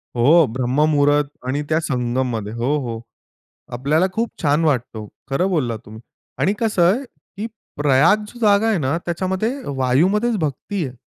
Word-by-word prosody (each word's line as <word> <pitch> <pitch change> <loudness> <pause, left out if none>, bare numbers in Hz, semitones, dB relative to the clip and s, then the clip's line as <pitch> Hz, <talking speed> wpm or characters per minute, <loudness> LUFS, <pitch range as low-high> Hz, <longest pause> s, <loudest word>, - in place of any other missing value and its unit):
हो, 150 +7 +5
ब्रह्ममुहूर्त 145 +4 +2 0.2
आणि 140 +3 -1
त्या 155 0 +2
संगममध्ये. 120 -5 -2
हो, 125 +6 0
हो. 115 -4 -5 0.7
आपल्याला 150 +8 +1
खूप 230 +3 -1
छान 150 +1 +2
वाटतो. 120 -7 -1 0.2
खरं 180 +8 +1
बोललात 125 -10 -1
तुम्ही. 110 +1 -11 0.4
आणि 195 - +2
कस 220 -4 -1
आहे, 180 +9 +4
की 220 -3 -10 0.3
प्रयाग 150 +9 +3
जी 240 - -13
जागा 210 0 +4
आहे 215 -4 +2
ना, 145 +1 0
त्याच्यामध्ये 185 +6 -1 0.3
वायूमध्येच 190 - +2
भक्ती 160 +4 -3
आहे. 125 0 -10
150 Hz, 145 wpm, -20 LUFS, 130-190 Hz, 0.7 s, हो